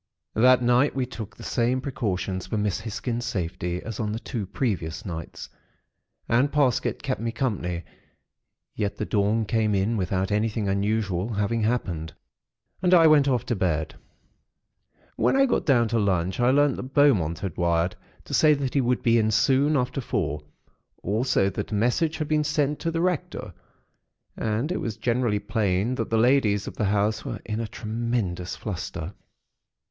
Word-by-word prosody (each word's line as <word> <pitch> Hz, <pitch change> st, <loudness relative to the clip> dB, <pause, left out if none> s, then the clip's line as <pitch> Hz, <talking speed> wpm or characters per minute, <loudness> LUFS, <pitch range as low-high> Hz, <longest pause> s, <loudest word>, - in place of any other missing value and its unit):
"That 125 Hz, +2 st, +5 dB
night, 125 Hz, +4 st, +3 dB
we 130 Hz, -2 st, 0 dB
took 115 Hz, -4 st, -8 dB
the -, -, -10 dB
same 125 Hz, +1 st, +1 dB
precautions 95 Hz, -8 st, -3 dB
for 110 Hz, -, -2 dB
Miss 105 Hz, -2 st, 0 dB
Hisgins' 115 Hz, +2 st, -4 dB
safety, 90 Hz, -4 st, -3 dB
as 115 Hz, -3 st, -6 dB
on 105 Hz, -1 st, -1 dB
the -, -, -2 dB
two 110 Hz, -5 st, -5 dB
previous 95 Hz, -8 st, -2 dB
nights; 85 Hz, -4 st, -6 dB, 0.8 s
and 130 Hz, +5 st, +2 dB
Parsket 140 Hz, -5 st, +1 dB
kept 130 Hz, -4 st, -2 dB
me 115 Hz, 0 st, -1 dB
company; 90 Hz, -9 st, -2 dB, 0.9 s
yet 100 Hz, -1 st, -2 dB
the -, -, -2 dB
dawn 105 Hz, +2 st, +1 dB
came 110 Hz, 0 st, +1 dB
in 100 Hz, +4 st, +1 dB
without 95 Hz, +1 st, -1 dB
anything 105 Hz, 0 st, 0 dB
unusual 100 Hz, 0 st, 0 dB
having 105 Hz, +3 st, 0 dB
happened, 90 Hz, -9 st, -2 dB, 0.7 s
and 180 Hz, 0 st, +5 dB
I 165 Hz, -2 st, +7 dB
went 150 Hz, -3 st, +6 dB
off 125 Hz, -4 st, +1 dB
to 120 Hz, -, -1 dB
bed. 80 Hz, -5 st, -1 dB, 1.2 s
"When -, -, +2 dB
I 270 Hz, 0 st, +5 dB
got 250 Hz, -, 0 dB
down 120 Hz, -5 st, +4 dB
to 115 Hz, 0 st, +1 dB
lunch, 95 Hz, -2 st, 0 dB
I 120 Hz, 0 st, +4 dB
learnt 145 Hz, 0 st, +3 dB
that 130 Hz, +2 st, -8 dB
Beaumont 105 Hz, -, +4 dB
had 95 Hz, -5 st, -5 dB
wired 85 Hz, 0 st, +1 dB, 0.3 s
to -, -, -8 dB
say 155 Hz, -1 st, +5 dB
that 135 Hz, -2 st, -3 dB
he 140 Hz, -, +3 dB
would 125 Hz, 0 st, 0 dB
be 115 Hz, 0 st, +4 dB
in 110 Hz, -1 st, +2 dB
soon 135 Hz, +7 st, +3 dB
after 125 Hz, +1 st, -1 dB
four; 75 Hz, -, -2 dB, 0.6 s
also 110 Hz, +1 st, +1 dB
that 95 Hz, -, -5 dB
a -, -, -1 dB
message 125 Hz, +9 st, +1 dB
had 155 Hz, -, -2 dB
been 155 Hz, 0 st, +2 dB
sent 150 Hz, -1 st, 0 dB
to 165 Hz, -, -1 dB
the 165 Hz, 0 st, -1 dB
Rector. 180 Hz, -4 st, -2 dB, 0.8 s
And 115 Hz, +8 st, -1 dB
it 185 Hz, -, -1 dB
was 110 Hz, -3 st, -4 dB
generally 120 Hz, -3 st, +1 dB
plain 105 Hz, 0 st, 0 dB
that 115 Hz, -3 st, -3 dB
the 115 Hz, -, +1 dB
ladies 110 Hz, -4 st, +3 dB
of -, -, -7 dB
the 105 Hz, -, 0 dB
house 105 Hz, +2 st, +1 dB
were -, -, -5 dB
in 110 Hz, 0 st, -3 dB
a 115 Hz, -, -2 dB
tremendous 110 Hz, -5 st, -3 dB
fluster. 90 Hz, -3 st, -5 dB
110 Hz, 175 wpm, -25 LUFS, 100-130 Hz, 1.2 s, I